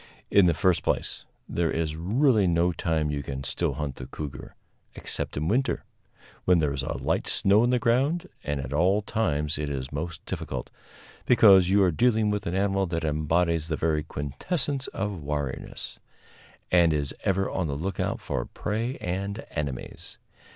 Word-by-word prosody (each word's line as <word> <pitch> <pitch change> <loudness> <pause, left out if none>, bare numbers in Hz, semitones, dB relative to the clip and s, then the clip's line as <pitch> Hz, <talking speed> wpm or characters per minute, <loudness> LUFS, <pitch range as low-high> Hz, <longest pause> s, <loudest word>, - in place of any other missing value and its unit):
In 100 -3 +6
the 85 - +3
first 90 +2 +2
place, - - -2 0.2
there 85 -1 0
is 80 -1 -1
really 105 - +3
no 85 +1 +3
time 80 -2 0
you 70 -1 -2
can 70 -1 -5
still 80 +2 -1
hunt 70 -2 -4
the 65 - -7
cougar 70 +1 -7 0.4
except - - -3
in 75 +2 -1
winter, 130 +8 +1 0.6
when 90 -1 +4
there 75 -4 +1
is 70 - -2
a 65 - -3
light - - -1
snow 100 +2 +4
on 120 - +3
the 125 - +3
ground, 130 +8 +1 0.2
and 75 -1 -2
at 70 0 -5
all 95 +7 +3
times 75 -10 0
it 75 -1 -2
is 65 -2 -4
most 80 +3 -5
difficult, - - -5 0.6
because 95 -7 +7
you 100 +1 +5
are 90 - +4
dealing 110 +3 +2
with 105 -1 -2
an 85 - -1
animal 95 0 +1
that 85 -1 -2
embodies 80 +1 +1
the 80 - -1
very 80 -1 +1
quintessence 135 - -3
of 100 -3 -3
wariness, 70 -2 -4 0.7
and 85 -3 +5
is 70 -2 0
ever 95 0 +1
on 90 -3 -1
the 70 - -2
lookout 95 +5 -2
for - - -3
prey 115 +5 -3
and 100 +4 -3
enemies. 70 -5 -5
85 Hz, 170 wpm, -27 LUFS, 75-100 Hz, 0.7 s, because